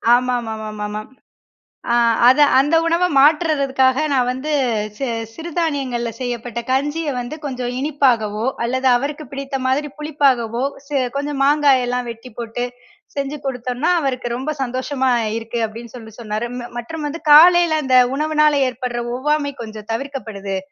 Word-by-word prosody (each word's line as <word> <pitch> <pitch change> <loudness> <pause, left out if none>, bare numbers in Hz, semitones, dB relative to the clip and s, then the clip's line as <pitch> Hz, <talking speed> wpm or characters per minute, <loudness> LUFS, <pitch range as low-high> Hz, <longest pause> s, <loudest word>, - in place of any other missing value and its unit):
ஆமாமாமாமா. 220 -4 -3 0.9
அ - - +3 0.3
அத 260 - +5 0.2
அந்த 290 +5 +3
உணவ 335 +2 +2
மாற்றுறதுக்காக 275 -3 +3
நான் 255 -2 +2
வந்து 260 +4 -4 0.5
சி 270 - -3 0.3
சிறுதானியங்கள்ல 285 -8 -2
செய்யப்பட்ட 240 -2 -4
கஞ்சிய 295 +4 0
வந்து 245 +5 -5
கொஞ்சம் 250 -3 -3
இனிப்பாகவோ, 240 -7 +1 0.2
அல்லது 260 +2 -1
அவருக்கு 290 +4 -3
பிடித்த 275 0 -4
மாதிரி 280 +3 0
புளிப்பாகவோ, 265 -6 +1 0.2
செ - - -21 0.3
கொஞ்சம் 285 0 -3
மாங்காய் 285 -2 +4
எல்லாம் 250 0 -2
வெட்டி 230 +2 -10
போட்டு, 235 +1 -3 0.5
செஞ்சு 280 +1 -3
கொடுத்தோன்னா, 250 +3 -1
அவருக்கு 255 -4 -2
ரொம்ப 265 +4 -3
சந்தோஷமா 260 +1 -1 0.3
இருக்கு 230 +1 -4
அப்பிடின்னு 230 +2 -10
சொல்லி 220 -3 -11
சொன்னாரு. 215 +1 -3
ம 240 -1 -6
மற்றும் 295 +6 -5
வந்து 325 +3 -6
காலையில 335 0 +7
அந்த 260 -1 +3 0.2
உணவினால 305 0 +3 0.2
ஏற்பட்ற 250 -1 -4 0.2
ஒவ்வாமை 290 +2 0
கொஞ்சம் 215 -1 -9
தவிர்க்கப்படுது, 225 -7 -4
260 Hz, 130 wpm, -19 LUFS, 240-295 Hz, 0.9 s, காலையில